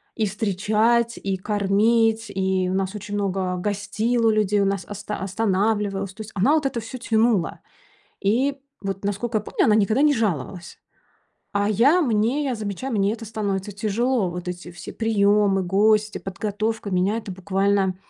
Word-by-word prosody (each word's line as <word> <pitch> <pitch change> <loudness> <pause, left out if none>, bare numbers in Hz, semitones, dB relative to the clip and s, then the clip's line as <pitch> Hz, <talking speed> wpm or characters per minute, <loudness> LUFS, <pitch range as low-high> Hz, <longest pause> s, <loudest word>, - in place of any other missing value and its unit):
и 220 -2 0
встречать, 220 +4 +1
и 195 -1 -1
кормить, 220 +3 +2
и 190 -1 +1
у 185 - -1
нас 190 +1 -1
очень 205 0 -5
много 190 -2 -1
гостило 210 +4 0
людей, 210 -1 +2
у - - +2
нас 195 -1 -1
оста 205 +1 -5
останавливалось, 200 0 0
то 220 - -9
есть 215 - -8
она 225 +10 +3
вот 305 -3 +2
это 235 - -3
всё 225 +4 -7
тянула. 225 -6 +1 0.6
И 255 +8 +2 0.3
вот, 195 0 -4
наскока 215 +3 -1
я - - -10
помню, - - 0
она 215 - +4
никогда 220 +5 +2
не 300 - +5
жаловалась. 185 - -3 0.8
А 205 +1 +2
я, 275 - +4
мне 235 +3 +1
я 260 -3 -1
замечаю, 215 +5 -4
мне 200 0 +2
это 225 0 -6
становится 205 -2 -3
тяжело. 220 +2 0
Вот 180 0 -6
эти 180 0 -6
все 175 - -9
приёмы, 205 -3 +2
гости, 210 +3 +2
подготовка, 210 +2 -3
меня 185 +4 +1
это 210 -3 -7
буквально, 195 0 0
205 Hz, 160 wpm, -23 LUFS, 195-225 Hz, 0.8 s, не